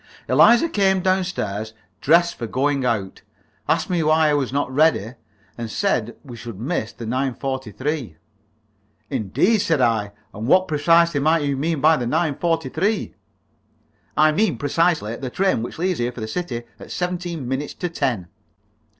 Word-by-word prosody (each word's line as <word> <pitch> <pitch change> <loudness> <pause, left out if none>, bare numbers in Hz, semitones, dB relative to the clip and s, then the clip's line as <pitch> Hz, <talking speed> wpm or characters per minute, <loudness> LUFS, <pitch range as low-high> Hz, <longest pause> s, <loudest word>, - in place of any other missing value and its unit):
Eliza 240 +8 +6
came 195 - +2
down 185 0 +2
stairs, 110 - -4 0.3
dressed 170 +3 +4
for 115 - -6
going 140 +3 0
out, 105 -6 -2 0.5
asked - - +1
me 175 -2 0
why 155 0 +3
I - - +2
was 140 -4 0
not 140 -1 -1
ready, 140 -7 +2 0.5
and 115 -1 -4
said 120 - -1
we 125 -5 -10
should 115 -3 -9
miss 120 -2 -2
the 115 - -9
9.43. 130 - -3 1.0
"Indeed!" 135 - +1
said 165 -6 +1
I. 110 -5 +1 0.2
"And 110 +3 -5
what, 185 +6 +4
precisely, 165 +1 +3
might 155 +2 +2
you 140 -1 0
mean 155 +2 -1
by 155 +1 +5
the 120 - -2
9.43?" 165 - 0 1.0
"I 155 0 +5
mean, 210 +8 +1
precisely, 150 -6 +1
the 130 - -5
train 190 -3 +1
which 120 - -6
leaves 180 +1 -1
here 120 +1 0
for 125 - -10
the 110 - -3
city 120 -2 -4 0.2
at - - -11
seventeen 175 -5 -3
minutes 135 +3 -3
to 180 - -3
ten." 130 - -2
145 Hz, 160 wpm, -22 LUFS, 120-170 Hz, 1.0 s, Eliza